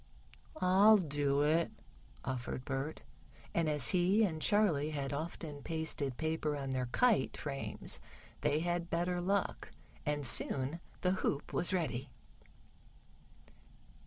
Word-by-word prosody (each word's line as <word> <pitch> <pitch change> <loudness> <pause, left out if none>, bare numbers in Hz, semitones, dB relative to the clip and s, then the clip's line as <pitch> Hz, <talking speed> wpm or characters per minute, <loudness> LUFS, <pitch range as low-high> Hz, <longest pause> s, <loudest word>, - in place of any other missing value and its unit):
"I'll 200 +4 +6
do 145 -5 +1
it," 160 +3 +2 0.6
offered 125 0 -4
Bert, 135 +3 -3 0.5
and 165 -2 +1
as 145 -6 +1
he 185 +5 +3
and 160 -6 -1
Charley 175 -9 +3
had 140 -2 -3
often 150 -1 -5
pasted 155 -4 -1
paper 160 -1 -1
on 135 -1 -4
their 130 -1 -1
kite 210 - +2
frames 140 -2 -3 0.4
they 150 +1 +1
had 175 0 -1
better 175 +1 0
luck, 195 +2 -1 0.3
and 145 -1 -1
soon 135 +5 +2 0.2
the 180 - +2
hoop 145 - -1
was 175 - +3
ready. 140 -8 -1
155 Hz, 120 wpm, -34 LUFS, 140-175 Hz, 0.6 s, I'll